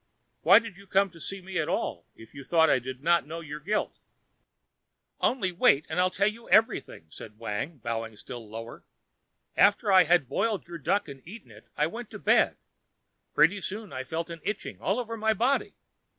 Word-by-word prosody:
Why 190 +5 +8
did 225 -4 -2
you 200 0 -15
come 195 0 +2
to 165 - -15
see 195 +4 -6
me 185 0 -4
at 155 - -1
all 85 -6 -2
if 110 - -15
you 140 -1 -9
thought 160 +2 +4
I - - +4
did 130 +2 -8
not 170 -2 +3
know 165 +2 -6
you 155 -3 -9
were 150 - -5
guilty?" 205 +8 -2 1.2
"Only 200 -8 +1
wait, 155 -4 +3
and 160 +3 -2
I'll 185 0 +4
tell 200 +2 +1
you 230 +2 -5
everything," 215 - +2
said 105 +5 -11
Wang, 115 +8 -4
bowing 115 -2 -4
still 115 -1 -9
lower. 115 +2 -8 0.7
"After 205 +1 +4
I 185 -2 +7
had 170 -4 +3
boiled 215 - -1
your 170 -1 -8
duck 200 +6 0
and 135 -2 -10
eaten 195 - -12
it, 105 0 -16
I 150 - +3
went 230 +8 -6
to - - -8
bed. - - +3 0.8
Pretty 170 +7 +4
soon 205 +2 -6
I 130 - -4
felt 165 +5 -4
an 165 -1 -8
itching 210 +3 -5
all 200 +6 0
over 230 -2 -4
my 220 0 +1
body. 250 +7 0
170 Hz, 200 wpm, -28 LUFS, 135-200 Hz, 1.2 s, Why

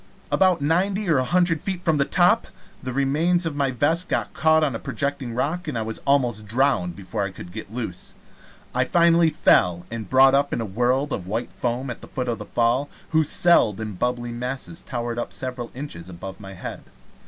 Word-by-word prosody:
About 185 -4 +3
ninety 190 +7 +1
or 145 - +4
a - - +1
hundred 175 +2 +2
feet 190 -2 -4
from 160 -4 +2
the 140 - +2
top, - - +3 0.3
the 130 - -4
remains 155 +7 +1
of 160 -3 -2
my 140 -2 +1
vest 155 +8 0 0.2
caught 160 0 +3
on 145 -4 +1
a 115 - -4
projecting 140 -4 -3
rock, 160 +7 -2
and 150 - -2
I 110 - -1
was 110 0 -4
almost 120 -6 +2
drowned 110 -7 +1
before 100 +2 -4
I 100 - -2
could 90 -2 -10
get 105 +1 -8
loose. 110 -7 -5 0.6
I - - +2
finally 170 -1 +4
fell, 90 - +3
and 115 -4 -5
brought 135 +1 +6
up 140 +1 +2
in - - -1
a 115 - -2
world 125 +7 0
of 90 - -4
white 110 +5 -3
foam 125 +2 -2
at 120 - -8
the - - -11
foot 125 -1 -4
of 115 - -2
the - - -7
Fall, 120 +5 +1 0.2
whose 160 -2 +2
celled 115 - +4
and 105 -4 -6
bubbly 125 -1 -1
masses 125 +7 -4
towered 120 -2 -4
up - - -4
several 125 -2 -5
inches 125 - -7
above 95 +3 -8
my 95 -2 -9
head. - - -7
130 Hz, 205 wpm, -23 LUFS, 115-155 Hz, 0.6 s, brought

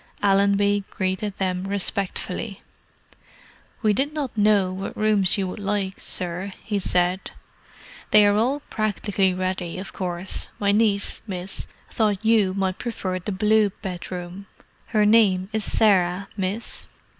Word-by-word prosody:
Allenby 200 0 +3
greeted 190 +1 -2
them 185 0 -1
respectfully. 200 +1 -2 1.2
"We 215 -1 +4
did 275 +7 0
not 290 -6 -3
know 205 -3 +3
what 190 +1 -6
rooms 215 -3 +3
you 195 -1 -1
would 185 - -6
like, 200 -1 -2
sir," 180 +2 -2
he 205 -2 -1
said. 180 0 +1 0.8
"They 210 -1 +7
are 205 0 +4
all 255 +7 +1
practically 205 -5 0
ready, 185 -2 -3
of 190 +1 -7
course. 180 0 -1
My 200 -1 +2
niece, 205 -1 +1
miss, 185 -1 -5 0.2
thought 210 -2 0
you 210 -4 +3
might 190 -1 -1
prefer 190 -6 -3
the 195 +4 -4
blue 210 +2 +3
bedroom. 180 +1 -6 0.4
Her 215 -2 +2
name 200 -4 +4
is 220 -1 0
Sarah, 190 -2 +2
miss." 200 +3 -4
200 Hz, 135 wpm, -24 LUFS, 185-210 Hz, 1.2 s, They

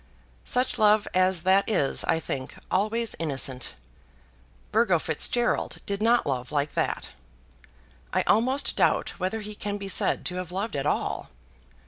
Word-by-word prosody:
Such 250 +1 0
love 215 0 +4
as 185 -2 +3
that 190 +3 +3
is, 160 -10 +2
I 160 - +2
think, 130 -4 -5 0.2
always 215 +4 +1
innocent. 135 -5 -2 1.0
Burgo 215 -5 +3
Fitzgerald 240 +8 0
did 200 0 -3
not 235 +2 +3
love 125 -3 -2
like 145 0 0
that. - - -2 1.0
I - - +1
almost 260 +6 +2
doubt - - +2
whether 190 +4 -2
he 210 0 -7
can 205 0 -4
be 200 -1 -6
said - - 0
to 180 - -2
have 180 -1 -5
loved 195 +2 -3
at 135 - -1
all. - - -1
195 Hz, 145 wpm, -26 LUFS, 160-220 Hz, 1.0 s, love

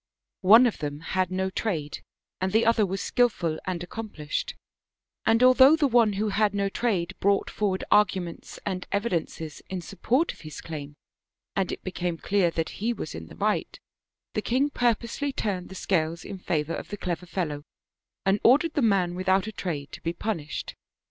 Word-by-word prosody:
One 225 +7 +8
of 235 - 0
them 145 -1 -4
had 185 +2 0
no 190 +1 -1
trade, 160 -9 -2 0.4
and 185 0 -1
the 220 +3 +3
other 225 -3 +4
was 195 +1 -3
skillful 175 -10 +1
and 175 -2 -2
accomplished; 220 - -4 0.7
and 225 +2 +4
although 260 +3 +8
the 310 -2 +2
one 235 -4 +4
who 210 +2 0
had 210 0 +2
no 200 0 +1
trade 195 -6 -1
brought 200 0 +2
forward 195 -3 -1
arguments 185 -4 +1
and 185 -2 -3
evidences 170 -7 -2
in 190 -1 -3
support 230 - 0
of - - -17
his 155 -2 -8
claim, 150 -3 -7 0.6
and 190 -2 0
it - - -6
became 175 -2 -2
clear 190 0 +2
that 165 -1 -2
fie 230 +4 -1
was - - -6
in - - -7
the - - -12
right, - - -1 0.5
the - - 0
king 270 +4 +1
purposely 245 +3 0
turned 190 -8 -3
the 190 - -9
scales 170 -3 -1
in 195 -2 -7
favor 160 -2 -1
of - - -6
the 205 - -5
clever 180 -1 -3
fellow, 155 -5 -2 0.6
and 195 +2 +3
ordered 300 +7 +5
the 290 - +1
man 195 -6 +2
without 190 +1 +2
a 220 - -4
trade 155 -9 -4
to - - -9
be 165 - -2
punished. 170 -8 -4
190 Hz, 180 wpm, -26 LUFS, 170-225 Hz, 0.7 s, One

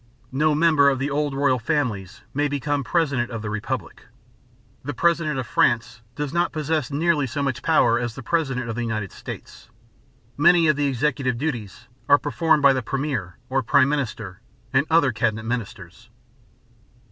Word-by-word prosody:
No 150 +3 +2
member 155 -3 +4
of 135 - 0
the 135 +3 -2
old 145 -1 -1
royal 135 -2 +2
families 115 - -2
may 145 +2 +1
become 145 0 -2
president 140 -7 0
of 115 -3 -6
the 105 - -4
republic. 110 +5 -5 0.8
The 145 0 -5
president 165 -3 +1
of 130 - -2
France 115 0 +1
does 145 -1 -4
not 170 0 +1
possess 155 -3 -1
nearly 150 -1 +1
so 140 +4 -3
much 130 -3 -2
power 125 -6 +3
as 120 -2 -4
the 135 - -8
president 135 -4 -1
of 115 - -3
the 120 - -3
United 110 -5 -3
States. - - -10 0.7
Many 170 +2 +5
of 155 - +4
the 145 0 0
executive 130 -2 0
duties 120 -8 -4 0.2
are 145 - +8
performed 155 +2 +1
by 140 -1 +7
the 130 - -1
premier, 130 - -3
or 135 +1 0
prime 135 +3 +3
minister, 115 -9 -3 0.3
and 135 +3 +2
other 160 -5 +4
cabinet 110 0 -1
ministers. 110 -3 -6
135 Hz, 170 wpm, -23 LUFS, 120-150 Hz, 0.8 s, are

